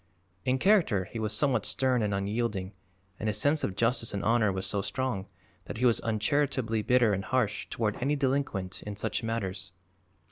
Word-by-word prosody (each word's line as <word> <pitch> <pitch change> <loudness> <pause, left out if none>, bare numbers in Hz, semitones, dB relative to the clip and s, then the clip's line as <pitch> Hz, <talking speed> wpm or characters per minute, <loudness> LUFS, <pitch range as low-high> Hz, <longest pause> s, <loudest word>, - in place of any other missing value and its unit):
In 130 0 +2
character 160 - +3
he 115 +4 -7
was 110 -1 -1
somewhat 125 +6 +2
stern 130 -2 +1
and 105 -1 0
unyielding 100 -1 -2 0.5
and 110 - -1
his 105 - +1
sense 145 +5 +2
of 95 - -2
justice 115 -1 +2
and 100 - -3
honor 110 -2 +3
was 95 0 -3
so 100 +1 +1
strong 110 -3 -2 0.4
that - - -6
he 125 - +1
was 120 -2 +4
uncharitably 115 0 0
bitter 120 -1 +3
and 95 0 -2
harsh 115 -5 0
toward 110 -3 -1
any 140 +4 0
delinquent 130 -9 -1
in 105 -1 -6
such 100 - -2
matters. 95 -5 -3
110 Hz, 180 wpm, -29 LUFS, 100-130 Hz, 0.5 s, was